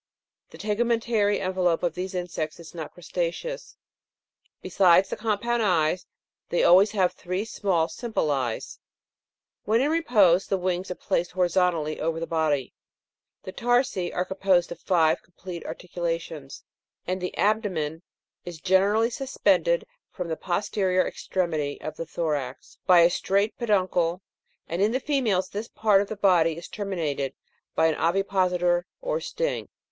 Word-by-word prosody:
The - - -13
tegumen 230 +3 +1
tary 210 -3 +1
envelope 185 -3 0
of 175 -2 +1
these 185 +2 -5
insects 170 -3 -4
is 170 0 -12
not 160 -3 -6
crustaceous; 175 - -4 0.8
besides 185 0 +4
the - - -2
compound 230 +2 0
eyes, 180 -3 +1 0.4
they 175 - +1
always 190 +4 +7
have, 185 -4 +2
three 185 +4 -3
small 185 -7 0
simple 220 -10 -2
eyes. 130 -5 -3 0.9
When 220 +2 +3
in 285 +4 +2
repose 205 - +4
the 195 - +1
wings 180 0 -2
are 180 - -3
placed 175 0 -1
horizontally 175 -4 +1
over 165 +1 -1
the 165 - -3
body. 155 -5 0 0.7
The 185 - -6
tarsi 245 -6 +1
are 180 - -1
composed 190 -2 +1
of 170 - -7
five 165 -4 +2
complete 175 -1 -9
articulations; 165 -5 -5 0.4
and 185 0 -2
the 180 - -4
abdomen 185 -8 0 0.4
is 175 -2 -8
generally 200 +6 +3
suspended 280 - +1 0.2
from 180 -3 -6
the 160 - -1
posterior 185 +1 0
extremity 160 -6 -2
of 155 - -6
the 165 - -6
thorax, 145 -6 -4
by 180 -2 +7
a 170 - +6
straight 200 +4 0
peduncle; 185 -5 +1 0.4
and 170 +3 -2
in 210 +3 +3
the 260 - +1
females 245 -10 0
this 210 +3 -5
part 210 -4 +3
of 200 - -3
the 220 - -4
body 170 -5 +3
is 170 - -8
terminated 155 -10 -3 0.4
by 160 - +3
an 160 - +3
ovipositor 180 -1 +1
or - - -2
sting. - - -3
180 Hz, 145 wpm, -26 LUFS, 170-205 Hz, 0.9 s, always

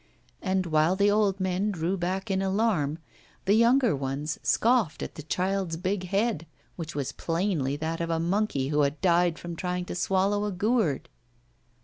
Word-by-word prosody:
And 190 -1 0
while 160 +2 +2
the 200 +1 +3
old 205 -2 +2
men 190 +2 0
drew 180 -1 -1
back 190 +3 -2
in 190 0 +1
alarm, 190 -7 +1 0.5
the 195 - +4
younger 235 - +4
ones 140 +3 -3
scoffed 230 -8 +2
at - - -6
the - - -8
child's 185 +2 -1
big 185 +2 -2
head, 195 -3 0 0.3
which 160 -3 -6
was 140 -3 -2
plainly 165 -5 -1
that 160 +2 -3
of 170 - -2
a 165 -1 0
monkey 170 -6 0
who 150 0 +2
had 145 +1 0
died 175 -2 +3
from 170 -1 -7
trying 180 +1 -3
to - - -5
swallow 195 +3 +1
a 210 - -2
gourd. 200 - 0
180 Hz, 170 wpm, -27 LUFS, 160-200 Hz, 0.5 s, the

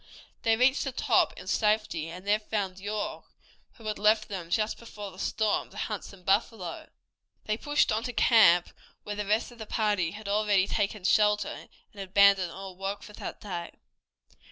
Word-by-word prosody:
They 225 0 +2
reached 260 +3 +3
the 270 - -3
top - - +2
in - - -9
safety, 210 -7 0
and 180 +3 -9
there 205 +1 +3
found 200 -3 -3
York, 205 +1 -4 0.5
who 225 - -16
had 215 0 -3
left 215 +1 +3
them 180 -4 -6
just 215 +4 0
before 210 -4 -8
the 185 - -14
storm 215 -1 0
to - - -14
hunt 210 -3 -3
some 195 -2 -13
buffalo. 195 -2 -1 0.6
They 215 - 0
pushed 290 +6 +1
on 215 +1 +1
to 245 - -4
camp 185 -8 +5 0.3
where 210 - -5
the 205 -1 -4
rest 215 +4 +1
of 240 - -16
the 220 - -7
party 210 -7 +1
had 210 0 -9
already 205 -2 +3
taken 205 -1 -2
shelter, 210 +1 +3
and - - -9 0.3
had 195 -1 -6
abandoned 195 -2 +5
all 190 0 -8
work 195 +2 -4
for 210 - -12
that - - -7
day. 175 -4 -6
210 Hz, 185 wpm, -28 LUFS, 190-215 Hz, 0.6 s, camp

